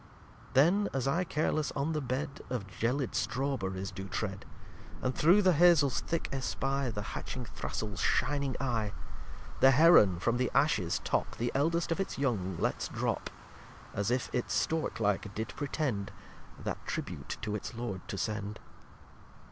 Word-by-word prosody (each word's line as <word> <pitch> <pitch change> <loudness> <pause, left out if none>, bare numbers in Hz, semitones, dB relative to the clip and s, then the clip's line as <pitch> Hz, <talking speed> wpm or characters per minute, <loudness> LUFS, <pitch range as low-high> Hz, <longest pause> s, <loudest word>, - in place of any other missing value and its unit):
lxvii - - -20
Then 180 +10 +5
as 135 -1 0
I 170 +7 +2
carless 155 -2 0
on 150 +3 -1
the 155 - -1
Bed 135 +2 -3
Of 125 -6 -2
gelid 120 +7 -1
Straw 135 +2 0
berryes 95 -3 -4
do 95 0 -6
tread, 100 -1 -4 0.5
And 130 - -1
through 180 +10 +5
the 185 -1 +5
Hazles 155 -7 +5
thick 165 -1 -2
espy 135 0 -1
The 105 -2 -4
hatching 125 -1 -5
Thrastle's 105 -2 -4
shining 140 -3 +1
Eye, 115 -6 -1 0.7
The 135 - +7
Heron 135 - +7
from 120 +6 +1
the 125 0 +1
Ashes 105 - +2
top, - - -1
The 120 +1 -1
eldest 165 +5 +1
of 165 - 0
its 195 - -2
young 100 -10 -1
lets - - -1
drop, - - -2 0.6
As 100 +1 -1
if 125 +1 0
it 125 - -1
Stork 160 -5 0
like 105 -1 0
did 110 +1 -3
pretend 140 -8 -2 0.5
That - - -5
Tribute 70 - -4
to 105 - -2
its 105 +3 -4
Lord 110 -6 -4
to 95 - -4
send. 105 +1 -3
130 Hz, 160 wpm, -31 LUFS, 105-145 Hz, 0.7 s, The